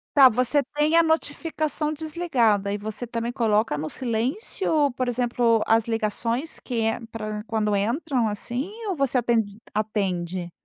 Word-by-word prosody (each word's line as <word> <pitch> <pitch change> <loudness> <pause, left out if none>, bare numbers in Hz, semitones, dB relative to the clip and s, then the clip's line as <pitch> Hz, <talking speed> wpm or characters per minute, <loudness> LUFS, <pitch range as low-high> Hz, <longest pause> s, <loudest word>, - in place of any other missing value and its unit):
Tá, 275 -2 +9
você 255 +4 +2
tem 300 +2 +2
a 335 - +7
notificação 310 -1 -1
desligada 265 - +1
e - - -1
você 215 +3 -5
também 235 0 -3
coloca 220 - +1
no 155 +1 -3
silêncio? 280 - 0
Por 255 0 -2
exemplo, 240 -2 +2
as 225 0 +4
ligações 230 +5 -1
que 245 -3 -3
ent 225 +1 -1
pra 215 -1 -5
quando 215 -2 0
entram 240 +4 0
assim? 240 - -3 0.2
Ou 380 - -1
você 275 -3 +1
atende 225 -4 0 0.2
atende? 185 -5 -2
235 Hz, 145 wpm, -24 LUFS, 215-285 Hz, 0.2 s, Tá